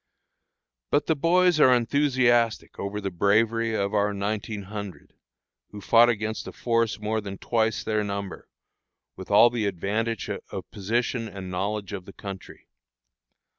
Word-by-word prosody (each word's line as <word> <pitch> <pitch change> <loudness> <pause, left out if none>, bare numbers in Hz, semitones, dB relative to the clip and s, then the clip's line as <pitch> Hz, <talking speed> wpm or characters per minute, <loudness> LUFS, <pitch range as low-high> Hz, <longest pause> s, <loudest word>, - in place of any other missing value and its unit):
But 145 - +2
the 160 - +1
boys 175 +2 +3
are 130 - +7
enthusiastic 125 -2 +2
over 100 +1 -3
the 100 -2 -4
bravery 110 +5 +2
of 100 0 -1
our 105 -1 +1
nineteen 105 +1 -3
hundred, 100 -5 -8 0.6
who 105 - -9
fought 115 +3 +5
against 110 -1 -2
a - - -6
force 115 -3 0
more 110 +1 -1
than 100 -1 -7
twice 115 +1 0
their 110 -1 0
number, 100 -1 -5 0.7
with - - -10
all 120 - +6
the 115 -4 -1
advantage 105 +4 -2
of - - -7
position 115 +3 -1
and 95 -3 -8
knowledge 100 +2 -3
of 95 -3 -6
the 100 - -12
country. 95 -2 -9
110 Hz, 145 wpm, -25 LUFS, 100-115 Hz, 0.7 s, are